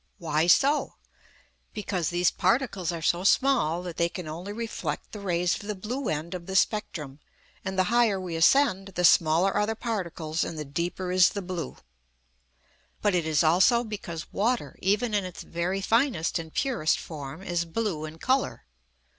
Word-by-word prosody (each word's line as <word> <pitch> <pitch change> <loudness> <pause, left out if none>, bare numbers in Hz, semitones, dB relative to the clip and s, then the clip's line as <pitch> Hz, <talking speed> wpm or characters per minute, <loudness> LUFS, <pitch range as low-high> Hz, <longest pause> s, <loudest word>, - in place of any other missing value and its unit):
Why 160 -3 0
so? 280 +11 +3 0.8
Because 190 -6 -2
these 175 0 +2
particles 225 -8 0
are 165 -2 -5
so 175 +2 +1
small 195 - +3
that 175 -2 -7
they 170 0 +2
can 180 -2 -7
only 170 +6 -6
reflect 210 -9 -4
the 210 - -7
rays 175 -3 0
of 205 - -6
the 210 - -2
blue 235 +7 -4
end 155 +3 -3
of 175 -2 -7
the 190 - -4
spectrum; 160 -9 0 0.4
and 190 0 -4
the 185 - +4
higher 230 -5 +3
we 180 -3 -5
ascend, 195 +2 +4
the 180 - +2
smaller 165 +3 +5
are 210 0 +1
the 225 - -1
particles 175 -8 -3
and 165 - -5
the 150 - -4
deeper 175 +5 -3
is 185 0 +6
the 200 - -5
blue. 175 -2 -5 1.3
But 205 -2 +3
it 170 -3 +1
is 155 0 +2
also 190 +9 +4
because 185 -8 -7
water, 235 +4 0
even 210 +4 +1
in 205 -2 +2
its 180 -1 -7
very 180 +3 -2
finest 225 - +1
and 160 -1 -8
purest 240 - +1
form, 150 +2 -8
is 175 -3 -1
blue 170 -2 -2
in 155 +1 -9
colour. 260 +9 0
180 Hz, 175 wpm, -27 LUFS, 165-210 Hz, 1.3 s, is